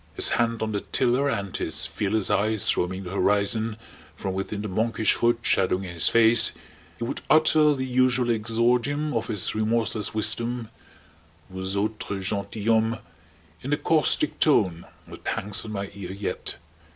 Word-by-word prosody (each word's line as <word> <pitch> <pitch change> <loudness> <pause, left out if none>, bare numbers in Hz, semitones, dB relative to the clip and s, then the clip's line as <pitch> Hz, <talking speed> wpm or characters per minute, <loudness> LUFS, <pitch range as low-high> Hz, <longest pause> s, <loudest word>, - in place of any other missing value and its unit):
His - - +5
hand 115 -1 0
on 110 - -2
the 100 - -1
tiller 130 +5 +1
and 100 -7 -3
his - - -1
fearless 105 0 -1
eyes 110 +1 +2
roaming 95 +2 -2
the 90 - -7
horizon 105 +3 +1 0.4
from 95 +3 -4
within 100 +2 -4
the - - -3
monkish 110 +3 +1
hood 120 0 +2
shadowing 95 -2 +1
his 85 -3 0
face, 115 0 +5 0.4
he - - -5
would 115 - -4
utter 155 -1 +5
the 130 -1 -3
usual 125 -1 +2
exordium 120 +7 0
of 115 -1 -2
his 105 -4 0
remorseless 110 -1 0
wisdom: 115 +1 -1 0.8
"Vous 95 +1 -4
autres 100 -2 -3
gentilhommes!" 110 +3 0 0.6
in 140 +3 -2
a - - +2
caustic 165 - +1
tone 95 - +2 0.2
that - - -11
hangs 105 +1 -1
on 110 - -7
my 100 -1 -4
ear 95 -2 -7
yet. 100 +1 -3
110 Hz, 150 wpm, -25 LUFS, 100-120 Hz, 0.8 s, His